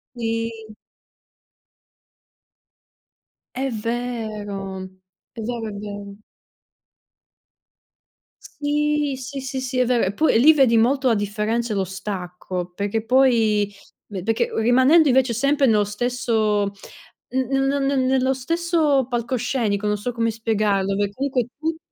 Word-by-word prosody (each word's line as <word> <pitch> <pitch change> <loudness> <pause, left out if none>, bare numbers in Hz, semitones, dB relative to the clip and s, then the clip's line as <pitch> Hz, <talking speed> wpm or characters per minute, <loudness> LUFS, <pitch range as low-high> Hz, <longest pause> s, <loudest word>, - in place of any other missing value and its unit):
Sì. 225 -2 -4 2.8
È 270 +1 -1
vero! 215 -4 -4 0.5
È - - -11
vero, 230 0 -4
è - - -6
vero. 205 0 -8 2.4
Sì! 295 -1 0
Sì, 265 +2 -6
sì, 265 0 -4
sì, 260 0 -3
è 250 - +4
vero. 235 -6 +1
Poi, 310 +2 +3
lì, 305 +6 +7
vedi 265 -6 +4
molto 260 +4 +2
la 235 - +4
differenza 210 +3 -1
e - - -1
lo 190 - 0
stacco 180 -1 -5
perché 205 +3 -2
poi 225 -5 +3 0.3
perché 220 +4 -2
rimanendo, 260 +8 +5
invece, 260 -2 +3
sempre 280 +4 +2
nello 215 -4 +3
stesso 220 -1 0 0.7
n 260 - 0
n 270 0 +2
ne 280 +1 +1
ne 275 0 +1
nello 260 0 +2
stesso 310 -1 +1
palcoscenico, 235 -3 -1
non 210 0 +1
so 205 +5 -3
come 230 -1 0
spiegarlo, 210 -3 0
perché 205 0 -1
comunque 260 -1 -1
tu 320 +2 -2
235 Hz, 120 wpm, -22 LUFS, 210-265 Hz, 2.8 s, lì